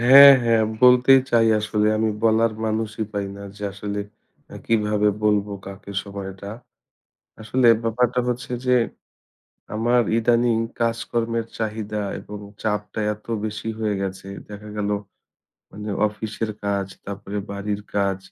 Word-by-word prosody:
হ্যাঁ, 140 +3 +10
হ্যাঁ। 115 -1 +4 0.2
বলতেই 125 +1 +7
চাই 115 -1 +4
আসলে 105 0 0
আমি 110 0 +2
বলার 115 0 +3
মানুষই 110 0 -2
পাই 100 -1 -2
না। 100 - -9
যে 105 - -11
আসলে 100 +1 -4 0.7
কিভাবে 105 -2 +2 0.2
বলব 105 -1 +3 0.2
কাকে 100 +1 -9
সময় 100 -1 -6
এটা? 100 +1 -9 0.9
আসলে 120 +3 +2 0.2
ব্যাপারটা 125 +2 +1
হচ্ছে 125 0 -4
যে 125 0 +4 1.0
আমার 120 +3 +3 0.2
ইদানিং 115 0 +3 0.2
কাজকর্মের 115 0 -1
চাহিদা 105 -1 -3 0.2
এবং 105 0 -9 0.2
চাপটা 105 -1 -2
এত 105 - -21 0.2
বেশি 110 +1 -4
হয়ে 110 -2 0
গেছে, 95 0 -5 0.2
দেখা 105 0 -9
গেল 105 -1 -1 0.8
মানে 105 +1 -8 0.2
অফিসের 110 +1 -4
কাজ 100 -1 0 0.2
তারপরে 100 +1 -5
বাড়ির 100 +1 -3 0.2
কাজ, 100 -1 +1
110 Hz, 130 wpm, -23 LUFS, 105-115 Hz, 1.0 s, হ্যাঁ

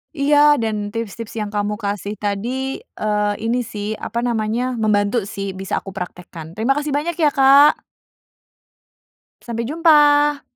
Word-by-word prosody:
Iya! 290 0 +4
Dan 210 -2 -2
tips-tips 230 0 -6
yang 210 - -2
kamu 205 +1 -2
kasih 205 0 -4
tadi, 240 +7 -3
eee, 210 -1 -1
ini 235 +3 -1
sih 210 -1 -5
apa 235 +2 -4
namanya? 240 +1 -1
Membantu 215 0 +1
sih, 195 -1 -6
bisa 190 0 -3
aku 195 - -11
praktekkan. 175 -3 -8
Terima 225 +9 0
kasih 295 0 -2
banyak 300 +4 -1
ya, 310 -3 +2
Kak. 275 +2 +5 1.6
Sampai 235 -1 -4
jumpa! 295 -1 +4
230 Hz, 135 wpm, -20 LUFS, 205-280 Hz, 1.6 s, Kak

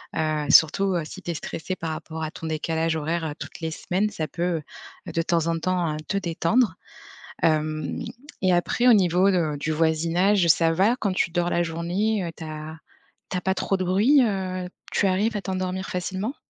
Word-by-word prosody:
heu, 155 -2 0
surtout, 190 +5 +5
heu, 170 - 0
si 190 +5 -10
tu 175 - -3
es - - -2
stressé 165 +3 -5
par 165 -2 -5
rapport 160 +1 -6
à 155 - -2
ton 160 - -9
décalage 160 +1 -1
horaire, 160 +2 -2
heu, 150 - -3
toutes - - -8
les 160 -1 -3
semaines, 185 +6 -1
ça 155 -5 -3
peut, 170 +2 -2 0.5
heu, - - -4
de 165 - 0
temps 165 -1 +1
en 165 0 +1
temps, 175 -2 0
heu, - - -4
te 200 - -1
détendre. 185 +3 +1 0.7
Hem 155 -2 0 0.4
et 185 -1 +3
après 175 +8 +2
au - - +8
niveau 185 -1 +4
de 165 -5 +1
du 155 +2 -2
voisinage, 165 +4 +2
ça 165 +1 +5
va 200 +8 +3
quand 200 -5 -1
tu 170 - 0
dors 175 0 0
la 175 - +1
journée? 180 +6 -1
Heu, 170 - -4
tu - - -9
as 155 0 -7 0.5
tu 185 - 0
as - - -3
pas 190 +1 0
trop 195 - 0
de 185 - -2
bruit, 215 +11 +4
heu, 185 -4 -2 0.2
tu 200 - +2
arrives 205 +4 +1
à - - -3
t'endormir 185 0 -3
facilement? 190 +7 -3
175 Hz, 205 wpm, -24 LUFS, 160-190 Hz, 0.7 s, au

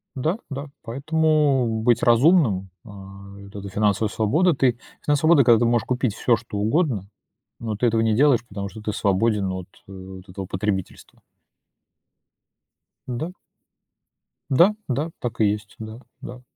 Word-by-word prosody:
Да, 155 - -1
да. 140 +1 -6
Поэтому, 140 -3 +1
быть 120 -1 +3
разумным, 120 - +3 0.2
а, 100 -1 -12
и 100 - -12
вот 100 +1 -14
эта 100 0 -7
финансовая 105 +1 +1
свобода. 155 - +2
Ты 130 -3 +1 0.3
финансовая 150 +3 +3
свобода, 140 - +5
когда 115 -2 +5
ты - - +2
можешь 120 0 +1
купить 125 -4 -1
всё 120 -2 +2
что 110 -2 -8
угодно, 110 - 0 0.5
но 110 -2 -4
ты 120 - -1
этого 115 0 +1
не 110 -1 +2
делаешь, 135 -2 +4
потому 100 -1 -6
что 110 - -11
ты 105 -1 -3
свободен, 100 0 +1
ну, 95 - -3
вот 95 - -8 0.2
от - - -47
вот 95 0 -11
этого 95 +1 -6
потребительства. 95 0 -4 1.9
Да. 130 +8 -4 1.2
Да 175 +10 +5
да, 145 +6 -1
так 120 -2 -4
и - - +5
есть, 105 0 -2
да 110 +2 -8 0.2
да. 125 +1 -9
115 Hz, 160 wpm, -23 LUFS, 100-135 Hz, 1.9 s, свобода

